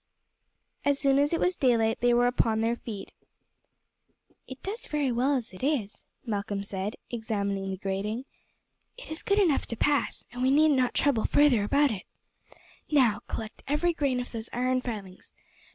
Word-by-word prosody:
As 285 Hz, -1 st, +2 dB
soon 275 Hz, -1 st, +3 dB
as 290 Hz, +1 st, +2 dB
it 335 Hz, -, +1 dB
was 360 Hz, 0 st, +1 dB
daylight 230 Hz, -5 st, +2 dB
they 245 Hz, 0 st, +4 dB
were 240 Hz, 0 st, +4 dB
upon 225 Hz, -3 st, +2 dB
their 230 Hz, +1 st, +1 dB
feet. 215 Hz, -4 st, -8 dB, 1.4 s
"It 260 Hz, 0 st, -10 dB
does 425 Hz, +5 st, -5 dB
very 290 Hz, -4 st, 0 dB
well 255 Hz, +4 st, +2 dB
as 235 Hz, -7 st, -4 dB
it 185 Hz, -, -11 dB
is," 255 Hz, -7 st, -1 dB, 0.2 s
Malcolm 205 Hz, -2 st, -2 dB
said, 200 Hz, +1 st, -4 dB, 0.2 s
examining 200 Hz, -4 st, -2 dB
the 190 Hz, -, -3 dB
grating. 200 Hz, +6 st, -3 dB, 0.7 s
"It -, -, -11 dB
is 315 Hz, -, -5 dB
good 400 Hz, -, +1 dB
enough 350 Hz, -9 st, +3 dB
to 230 Hz, -, -4 dB
pass, 290 Hz, +3 st, 0 dB
and 245 Hz, +1 st, -6 dB
we 260 Hz, -, +3 dB
need 305 Hz, +3 st, +5 dB
not 255 Hz, -3 st, +2 dB
trouble 270 Hz, -7 st, +2 dB
further 280 Hz, -8 st, +4 dB
about 280 Hz, +6 st, +3 dB
it. 200 Hz, -4 st, -6 dB, 0.8 s
Now 245 Hz, -9 st, +3 dB
collect 220 Hz, 0 st, -6 dB
every 300 Hz, +5 st, +1 dB
grain 275 Hz, -5 st, 0 dB
of 250 Hz, -, -5 dB
those 225 Hz, -1 st, -4 dB
iron 255 Hz, +1 st, +1 dB
filings. 205 Hz, -7 st, -7 dB
245 Hz, 170 wpm, -28 LUFS, 215-285 Hz, 1.4 s, need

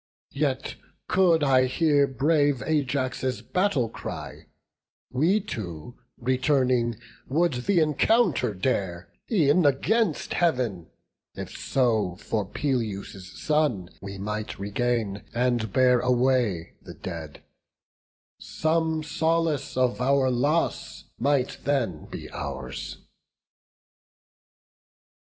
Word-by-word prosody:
Yet -, -, -1 dB, 0.3 s
could 175 Hz, -4 st, +4 dB
I 130 Hz, -2 st, +4 dB
hear 145 Hz, +1 st, +3 dB
brave 145 Hz, 0 st, +2 dB
Ajax' 130 Hz, -4 st, -1 dB
battle 180 Hz, -, +1 dB
cry, 115 Hz, -, -8 dB, 0.6 s
We 165 Hz, +11 st, +3 dB
two, 110 Hz, -, -7 dB, 0.2 s
returning, 130 Hz, -2 st, +1 dB, 0.3 s
would 170 Hz, +4 st, +2 dB
the 165 Hz, +9 st, +1 dB
encounter 155 Hz, -, +2 dB
dare, 90 Hz, -5 st, -2 dB, 0.2 s
E'en 170 Hz, -4 st, +4 dB
against 210 Hz, -, +1 dB
Heav'n, 125 Hz, -, 0 dB, 0.5 s
if -, -, -7 dB
so 110 Hz, -8 st, +1 dB
for 105 Hz, +2 st, -3 dB
Peleus' 100 Hz, -8 st, -3 dB
son 150 Hz, -, +1 dB
We 100 Hz, 0 st, -7 dB
might 105 Hz, +2 st, -4 dB
regain, 105 Hz, 0 st, -1 dB
and 120 Hz, -3 st, +1 dB
bear 125 Hz, +2 st, +4 dB
away 125 Hz, -8 st, +1 dB
the -, -, -11 dB
dead: 80 Hz, -5 st, -7 dB, 1.0 s
Some 160 Hz, 0 st, 0 dB
solace 160 Hz, -2 st, 0 dB
of 125 Hz, -3 st, +1 dB
our 135 Hz, 0 st, +3 dB
loss 145 Hz, +7 st, 0 dB, 0.2 s
might 135 Hz, 0 st, +1 dB
then 120 Hz, -, -1 dB
be -, -, -7 dB
ours." 65 Hz, -3 st, -6 dB
130 Hz, 95 wpm, -26 LUFS, 110-150 Hz, 1.0 s, could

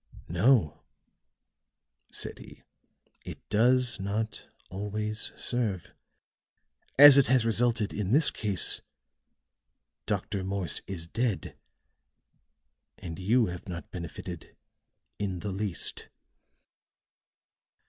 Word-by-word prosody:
"No," 95 Hz, -, +2 dB, 1.3 s
said -, -, -5 dB
he, -, -, -14 dB, 0.6 s
"it -, -, -10 dB
does 125 Hz, +3 st, +3 dB
not 105 Hz, +3 st, -4 dB, 0.2 s
always 105 Hz, +3 st, -3 dB
serve. 110 Hz, -8 st, -1 dB, 1.0 s
As 140 Hz, 0 st, +11 dB
it 135 Hz, -, +3 dB
has 130 Hz, -3 st, +3 dB
resulted 115 Hz, -1 st, +1 dB
in 105 Hz, -2 st, -3 dB
this 150 Hz, +4 st, +4 dB
case, 100 Hz, -5 st, 0 dB, 1.3 s
Dr. 100 Hz, -2 st, -2 dB
Morse 95 Hz, -2 st, -1 dB
is 90 Hz, -4 st, -4 dB
dead, 115 Hz, +3 st, -2 dB, 1.4 s
and 85 Hz, 0 st, -8 dB
you 115 Hz, +6 st, +3 dB
have 90 Hz, +2 st, -7 dB
not 85 Hz, -1 st, -7 dB
benefited 85 Hz, -1 st, -8 dB, 0.6 s
in 95 Hz, -4 st, -3 dB
the 105 Hz, -, -4 dB
least." 95 Hz, -2 st, -2 dB
105 Hz, 90 wpm, -28 LUFS, 95-120 Hz, 1.4 s, As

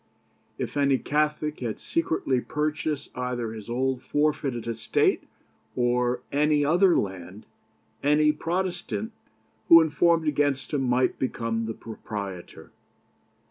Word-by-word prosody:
If -, -, -4 dB
any 140 Hz, -2 st, +3 dB
Catholic 150 Hz, +1 st, -1 dB
had 115 Hz, -4 st, -3 dB
secretly 160 Hz, -6 st, 0 dB
purchased 150 Hz, 0 st, -3 dB
either 125 Hz, -3 st, -3 dB
his 110 Hz, 0 st, -9 dB
old 130 Hz, +1 st, -1 dB
forfeited 145 Hz, -5 st, -1 dB
estate, 115 Hz, -1 st, +1 dB, 0.5 s
or 125 Hz, 0 st, +1 dB
any 150 Hz, 0 st, +2 dB
other 175 Hz, +4 st, +4 dB
land, 95 Hz, +1 st, -4 dB, 0.6 s
any 150 Hz, +1 st, +4 dB
Protestant 185 Hz, +6 st, -3 dB, 0.6 s
who 165 Hz, -, +11 dB
informed 165 Hz, +1 st, +2 dB
against 145 Hz, -1 st, 0 dB
him 145 Hz, -, +1 dB
might 125 Hz, 0 st, +1 dB
become 115 Hz, -3 st, -2 dB
the 115 Hz, -, -4 dB
proprietor. 100 Hz, -5 st, -8 dB
140 Hz, 110 wpm, -26 LUFS, 120-150 Hz, 0.6 s, who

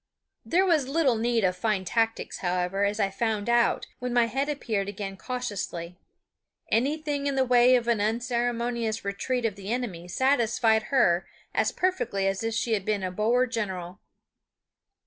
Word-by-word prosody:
There 370 Hz, +3 st, +2 dB
was 315 Hz, -8 st, +2 dB
little 280 Hz, -2 st, +2 dB
need 230 Hz, 0 st, +1 dB
of 185 Hz, -1 st, +2 dB
fine 190 Hz, 0 st, -1 dB
tactics, 225 Hz, +4 st, -1 dB
however, 180 Hz, +2 st, 0 dB
as 205 Hz, +1 st, -1 dB
I 195 Hz, -2 st, +1 dB
found 215 Hz, 0 st, -1 dB
out 235 Hz, 0 st, +2 dB
when 250 Hz, 0 st, -3 dB
my 240 Hz, -1 st, +4 dB
head 270 Hz, +5 st, -2 dB
appeared 215 Hz, -9 st, -2 dB
again 195 Hz, -1 st, -5 dB
cautiously. 195 Hz, -8 st, -4 dB, 0.8 s
Anything 285 Hz, +3 st, 0 dB
in 280 Hz, -, 0 dB
the 265 Hz, -1 st, +2 dB
way 250 Hz, 0 st, +5 dB
of 240 Hz, -1 st, 0 dB
an 230 Hz, -3 st, +2 dB
unceremonious 235 Hz, 0 st, -1 dB
retreat 235 Hz, +5 st, -2 dB
of 220 Hz, -, 0 dB
the 200 Hz, +1 st, -6 dB
enemy 210 Hz, -9 st, -3 dB
satisfied 230 Hz, -1 st, +2 dB
her 185 Hz, -10 st, +3 dB, 0.3 s
as -, -, +1 dB
perfectly 245 Hz, -, -1 dB
as 195 Hz, 0 st, 0 dB
if 225 Hz, 0 st, -1 dB
she 230 Hz, 0 st, 0 dB
had 200 Hz, -3 st, 0 dB
been 205 Hz, -1 st, -1 dB
a 185 Hz, -, -2 dB
Boer 230 Hz, +6 st, +2 dB
general. 190 Hz, -6 st, -4 dB
230 Hz, 165 wpm, -27 LUFS, 200-250 Hz, 0.8 s, way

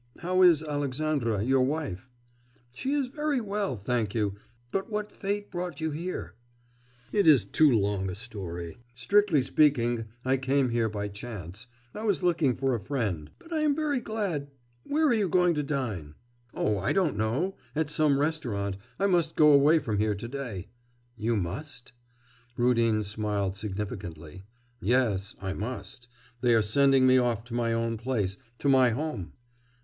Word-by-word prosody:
How 185 Hz, +2 st, +1 dB
is 170 Hz, -4 st, +6 dB
Alexandra 145 Hz, -6 st, -1 dB
your 130 Hz, +2 st, +3 dB
wife?' 130 Hz, -, -2 dB, 0.6 s
'She 260 Hz, -, -3 dB
is 285 Hz, -2 st, +1 dB
very 295 Hz, +1 st, -1 dB
well, 205 Hz, -, -2 dB
thank 110 Hz, 0 st, -1 dB
you. 105 Hz, -3 st, 0 dB, 0.4 s
But 195 Hz, +2 st, -2 dB
what 210 Hz, -1 st, -3 dB
fate 205 Hz, 0 st, -3 dB
brought 175 Hz, -4 st, -4 dB
you 160 Hz, 0 st, -1 dB
here?' 150 Hz, -, -5 dB, 0.8 s
'It 205 Hz, -4 st, +2 dB
is 140 Hz, -10 st, +6 dB
too 155 Hz, +9 st, +4 dB
long 100 Hz, -5 st, +1 dB
a 90 Hz, -, -5 dB
story. 95 Hz, -6 st, -6 dB, 0.2 s
Strictly 160 Hz, -, +3 dB
speaking, 120 Hz, -5 st, +2 dB, 0.2 s
I 130 Hz, +1 st, +3 dB
came 135 Hz, 0 st, +1 dB
here 115 Hz, -1 st, +1 dB
by 105 Hz, -1 st, -3 dB
chance. 100 Hz, 0 st, -8 dB, 0.3 s
I 215 Hz, -, -6 dB
was 200 Hz, -4 st, 0 dB
looking 160 Hz, -8 st, +2 dB
for 135 Hz, 0 st, 0 dB
a 120 Hz, -, 0 dB
friend. 100 Hz, -, -3 dB
But 330 Hz, -, -11 dB
I 315 Hz, -, +1 dB
am 300 Hz, -2 st, +2 dB
very 295 Hz, -4 st, 0 dB
glad...' 195 Hz, -11 st, -3 dB, 0.4 s
'Where 310 Hz, +2 st, +1 dB
are 260 Hz, -, +4 dB
you 210 Hz, -5 st, +1 dB
going 180 Hz, 0 st, +4 dB
to 150 Hz, -, 0 dB
dine?' 115 Hz, -, -3 dB, 0.4 s
'Oh, 105 Hz, -1 st, 0 dB
I 95 Hz, -, 0 dB
don't 180 Hz, -, +1 dB
know. 120 Hz, -, -1 dB, 0.2 s
At 155 Hz, -1 st, 0 dB
some 150 Hz, -3 st, +3 dB
restaurant. 120 Hz, -11 st, -1 dB, 0.2 s
I 200 Hz, -, +1 dB
must 175 Hz, -4 st, +2 dB
go 150 Hz, -1 st, +6 dB
away 145 Hz, +3 st, +6 dB
from 110 Hz, -10 st, -1 dB
here 105 Hz, -1 st, +1 dB
to 100 Hz, +4 st, -6 dB
day.' 120 Hz, -8 st, -5 dB, 0.5 s
'You 115 Hz, 0 st, 0 dB
must.' 120 Hz, -, -5 dB, 0.7 s
Rudin 115 Hz, -3 st, +3 dB
smiled 105 Hz, -2 st, -2 dB
significantly. 95 Hz, -4 st, -6 dB, 0.4 s
'Yes, 105 Hz, -4 st, +1 dB
I 95 Hz, -1 st, -3 dB
must. 125 Hz, +4 st, -6 dB, 0.3 s
They 120 Hz, -2 st, +4 dB
are 110 Hz, -, +4 dB
sending 135 Hz, +4 st, +4 dB
me 130 Hz, 0 st, +6 dB
off 120 Hz, -3 st, 0 dB
to 120 Hz, 0 st, -11 dB
my 120 Hz, -1 st, 0 dB
own 115 Hz, 0 st, -1 dB
place, 110 Hz, -5 st, -2 dB, 0.2 s
to 140 Hz, -, -2 dB
my 130 Hz, -2 st, +6 dB
home. 125 Hz, -, -4 dB
130 Hz, 165 wpm, -28 LUFS, 105-160 Hz, 0.8 s, is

